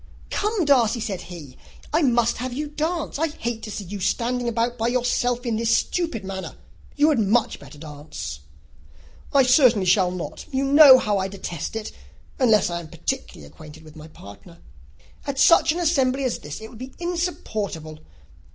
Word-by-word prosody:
"Come, 420 -4 0
Darcy," 245 -5 +3
said 210 -5 -4
he, 155 -7 -11 0.3
"I 315 - +3
must 240 -4 +2
have 255 +2 -4
you 295 +4 -3
dance. 310 0 -3
I 325 - +2
hate 240 -6 -5
to - - -7
see 205 0 -5
you 200 +2 -7
standing 245 +5 -1
about 235 +1 0
by 230 -1 -1
yourself 245 0 0
in 230 -2 -1
this 230 0 +2
stupid 325 - -2
manner. 190 0 -6 0.4
You 295 +1 +4
had 290 -6 +2
much 220 +2 +1
better 140 +2 -13
dance." 145 - -8 0.9
"I 275 -1 +5
certainly 250 -6 +4
shall 185 0 +3
not. 180 -2 -6
You 265 0 0
know 280 -1 +9
how 210 -5 0
I 190 - -1
detest 190 -2 -6
it, 220 -1 -5 0.5
unless 220 -8 +3
I 170 - -2
am 170 - -9
particularly 75 - -5
acquainted 150 - -14
with 155 -1 -15
my 155 0 -11
partner. 100 -10 -14 0.7
At 280 -1 -3
such 325 +2 +5
an 330 - -3
assembly 275 -6 +1
as 255 - -1
this, 150 +7 -8
it 220 - -9
would 225 - -13
be 260 +1 -9
insupportable. 215 - -4
230 Hz, 180 wpm, -23 LUFS, 185-270 Hz, 0.9 s, know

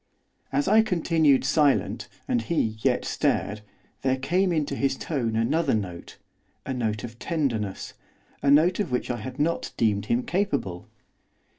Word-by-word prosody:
As 140 +1 0
I 215 +3 +6
continued 165 - +2
silent, 145 -1 +2 0.2
and 120 - +1
he 115 -5 0
yet - - +1
stared, 105 +1 0 0.4
there 130 0 +1
came 180 +8 +1
into 155 -4 -1
his 135 -1 0
tone 120 -8 -2
another 135 +5 +1
note, 90 -5 -5 0.5
a 135 - -2
note 110 -4 -2
of 120 -1 -8
tenderness, 120 - -2 0.5
a 140 - +2
note 165 +7 +5
of 205 - 0
which 125 0 -1
I 120 - -2
had 130 +3 -7
not 160 +3 0
deemed 105 -3 +1
him 120 +2 +1
capable. 170 - -2
135 Hz, 150 wpm, -26 LUFS, 115-165 Hz, 0.5 s, I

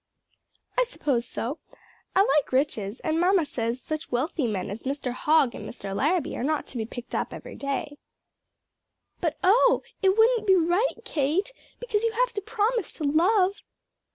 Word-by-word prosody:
"I - - +6
suppose 275 - -1
so; 260 +5 -4 0.6
I 385 - +6
like 285 0 +2
riches, 250 -5 0
and 315 +1 0
mamma 360 -1 +3
says 235 -2 -2
such 310 +3 -5
wealthy 265 +2 0
men 200 -2 -3
as 210 - -6
Mr. 270 -1 -3
Hogg 285 0 +3
and - - -7
Mr. 195 -4 -6
Larrabee 325 - +1
are - - -3
not 305 +2 0
to 255 - -7
be 220 -1 -2
picked 245 +1 -9
up - - -1
every - - -9
day." 280 +1 -4 1.2
"But, 325 -4 -1
oh, 470 +6 +5 0.2
it 385 0 +3
wouldn't 450 -1 +4
be 380 - +7
right, 355 +7 +2
Kate! 335 - 0 0.3
because 460 -3 -1
you 460 -1 +1
have - - +1
to 410 - -3
promise 445 +3 -1
to 315 - -7
love." 370 +7 +3
315 Hz, 170 wpm, -26 LUFS, 260-410 Hz, 1.2 s, be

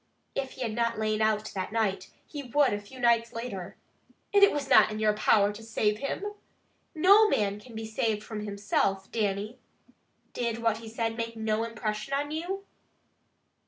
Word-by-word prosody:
If 270 -1 -3
he 260 - -5
had 225 -2 -2
not 230 0 0
lain 215 0 0
out 215 0 +1
that 190 0 -3
night, 215 -4 -1 0.2
he 290 - -7
would 280 0 +2
a 205 - -3
few 230 +6 -13
nights 235 -1 +3
later. 215 -6 -6 0.6
It 405 0 +7
was 285 -2 -2
not - - +6
in 215 - -4
your 215 -1 +2
power 210 -1 +3
to 210 - -10
save 215 -1 0
him. 280 - -3 0.7
No 400 +7 +6
man 205 - 0
can 230 +1 -14
be 220 0 -5
saved 220 -1 -1
from 215 -1 -6
himself, 200 -1 -1
Dannie. 210 +2 -2 0.7
Did 235 -2 -2
what 230 -2 +1
he 225 -1 -9
said 225 0 -2
make 230 0 -4
no 220 0 0
impression 220 +2 -3
on 290 +1 -2
you?" 365 +5 -4
225 Hz, 175 wpm, -28 LUFS, 210-245 Hz, 0.7 s, It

